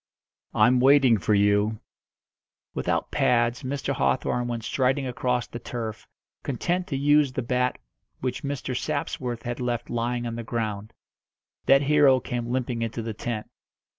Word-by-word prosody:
"I'm 125 +1 +5
waiting 130 -3 +5
for 105 - +2
you." 105 +2 +2 0.9
Without - - -1
pads 120 0 +2
Mr. 140 +1 -2
Hawthorn 125 -2 0
went 120 -1 -3
striding 135 +3 +1
across 125 -1 -1
the 120 - -8
turf, 115 -2 -6 0.3
content 175 +7 -1
to 140 - -2
use 145 -1 +3
the 130 - -2
bat 125 +1 0 0.4
which 125 0 -3
Mr. 140 -2 -3
Sapsworth 125 -4 -3
had 120 0 -4
left 120 -1 -2
lying 120 +1 -1
on 115 0 -4
the 115 - -4
ground. 110 -2 -3 0.7
That 135 +1 +6
hero 145 -2 +5
came 120 -1 -4
limping 125 -2 -1
into 115 0 -3
the 110 0 -4
tent. 110 0 -4
125 Hz, 145 wpm, -26 LUFS, 115-135 Hz, 0.9 s, That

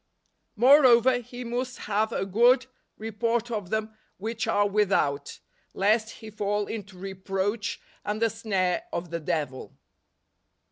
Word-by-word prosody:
" - - -49
Moreover, 250 0 +6
he 245 +1 -8
must 250 +2 -3
have 215 +2 0
a 195 - -1
good 240 +6 +4 0.3
report 230 +2 -1
of 205 -6 -3
them 220 +1 -2 0.2
which 225 +3 -3
are 205 0 +3
without; 190 -9 +1 0.4
lest 215 +3 +2
he 220 -1 -10
fall 205 0 -1
into 205 -4 -7
reproach 195 +2 -3 0.2
and 210 +1 -2
the 230 -1 +2
snare 210 - -1
of 170 -1 -4
the 170 - -2
devil." 150 -5 -3
215 Hz, 135 wpm, -27 LUFS, 195-235 Hz, 0.4 s, Moreover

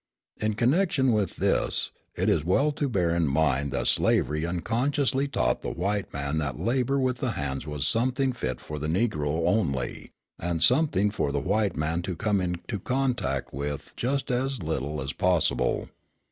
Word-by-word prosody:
In 105 0 -1
connection 135 - +2
with 105 -5 0
this, - - +2 0.2
it - - -1
is 80 - +3
well 140 - +2
to 145 -1 -2
bear 90 -7 +1
in 85 -2 +1
mind 70 -1 +1
that - - -1
slavery 75 +4 +2
unconsciously 130 - 0
taught - - 0
the - - -3
white 100 +3 -2
man 70 +2 -2
that 70 -5 -3
labour 130 +3 +1
with 130 -1 +1
the 125 -4 -1
hands 70 -2 -3
was 75 -2 -1
something 130 +3 +2
fit 65 - -3
for 75 0 -7
the 75 - -3
Negro 80 -4 0
only, 70 - -1 0.3
and 85 -1 -1
something 120 - +3
for 75 -8 -1
the 70 - 0
white 100 +7 0
man 80 +3 0
to 90 0 -4
come 105 0 +1
into 90 +4 -3
contact 130 +4 -1
with 70 +1 -4
just 135 +2 -1
as 130 -3 -1
little 75 -2 -2
as 70 0 -4
possible. 80 -9 +1
90 Hz, 170 wpm, -27 LUFS, 75-125 Hz, 0.3 s, is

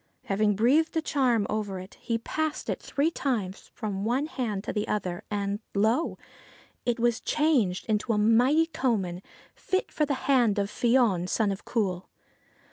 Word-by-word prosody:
Having 205 +1 +1
breathed 290 +10 +3
a - - +2
charm 250 -9 +2
over 210 -3 -2
it, 185 +2 -9
he 230 - -1
passed 310 +6 -2
it - - -4
three 295 +4 0
times 215 - -3
from 200 -4 -4
one 250 +6 +1
hand 225 -10 -3
to - - -4
the 210 - -1
other, 180 -4 -2
and 200 0 -2 0.2
lo, 225 +10 +1 0.7
it 240 -1 +1
was 235 -1 +1
changed 265 - +1
into 215 +2 0
a 215 - +1
mighty 245 +9 +4
coman, 210 - -1 0.3
fit 375 - -2
for 300 - 0
the 280 - 0
hand 240 -7 +3
of 200 0 -1
Fion, 230 -8 +2
son 210 0 +1
of 195 - -6
Cumhail. 190 -6 -1
225 Hz, 165 wpm, -27 LUFS, 200-265 Hz, 0.7 s, mighty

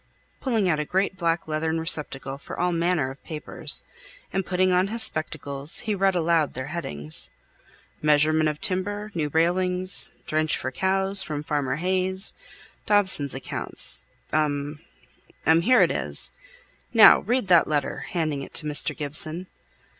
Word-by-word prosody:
pulling 225 -7 0
out 155 -4 +1
a - - 0
great 190 +4 -1
black 170 -2 -1
leathern 160 +1 -1
receptacle 140 -4 -1
for - - -9
all 180 0 +1
manner 170 -5 0
of 135 - -14
papers. 155 -2 0 0.5
And 195 - 0
putting 185 0 +1
on 180 +1 +2
his 225 +2 +2
spectacles, 145 -2 0
he 220 -3 -2
read 195 -1 +1
aloud 165 -3 +1
their 130 +2 -5
headings. 75 - -2 0.7
"'Measurement 155 +1 +3
of 150 0 -5
timber, 205 +3 -2
new 155 -3 -2
railings,' 180 +4 +2 0.2
'drench 155 0 0
for 130 - -4
cows, 190 +5 +2
from 150 -1 -3
Farmer 145 -4 -1
Hayes,' 185 +4 0 0.5
'Dobson's 185 -10 +3
accounts,' 135 - -2 0.3
'um 150 -1 -1 0.7
'um 165 +1 +4
here 250 +8 +5
it - - +1
is. - - -2 0.6
Now 220 - +8
read 245 0 -1
that 175 -3 +5
letter," 145 -2 -2
handing 155 -5 -2
it - - -10
to 155 - +1
Mr. 150 -1 +1
Gibson. 155 +4 -2
165 Hz, 145 wpm, -24 LUFS, 150-185 Hz, 0.7 s, Now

